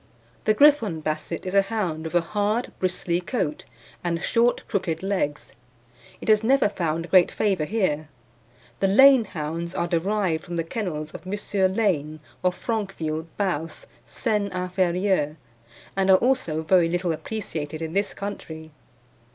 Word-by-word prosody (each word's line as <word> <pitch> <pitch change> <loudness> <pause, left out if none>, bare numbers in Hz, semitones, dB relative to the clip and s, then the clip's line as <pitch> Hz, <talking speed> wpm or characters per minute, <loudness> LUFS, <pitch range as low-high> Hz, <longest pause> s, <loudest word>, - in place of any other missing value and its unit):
The 215 - +3
Griffon 230 - +4
Basset 155 +3 -3
is 185 - -4
a 200 - +6
hound 195 -6 -3
with 160 - -5
a 175 - +5
hard 210 +6 -1
bristly 180 -1 0
coat, 175 - -3 0.4
and 170 -1 -1
short, 235 +6 +1
crooked 180 -5 -2
legs. 185 -7 -2 0.7
It - - -8
has 215 0 +4
never 260 -2 +4
found 165 -3 -2
great 185 -2 +6
favour 195 -7 0
here. 155 -7 -1 0.7
The 195 - +3
Lane 265 +4 +7
hounds 165 0 -5
are 170 - 0
derived 175 -1 0
from 175 - -6
the 165 - 0
kennels 160 -5 -4
of - - -10
M. 195 -1 0
Lane, 155 -9 0 0.2
of 180 -1 +2
Franqueville, 170 -8 -3
Baos, 180 - -2 0.2
Seine 210 -4 -1
Inferieure, 180 -3 0 0.6
and 195 0 +1
are 190 - +8
also 210 -12 0
very 175 0 +4
little 175 0 0
appreciated 160 -4 -5
in 160 0 -5
this 200 +1 0
country. 160 -6 -7
185 Hz, 145 wpm, -24 LUFS, 160-205 Hz, 0.7 s, are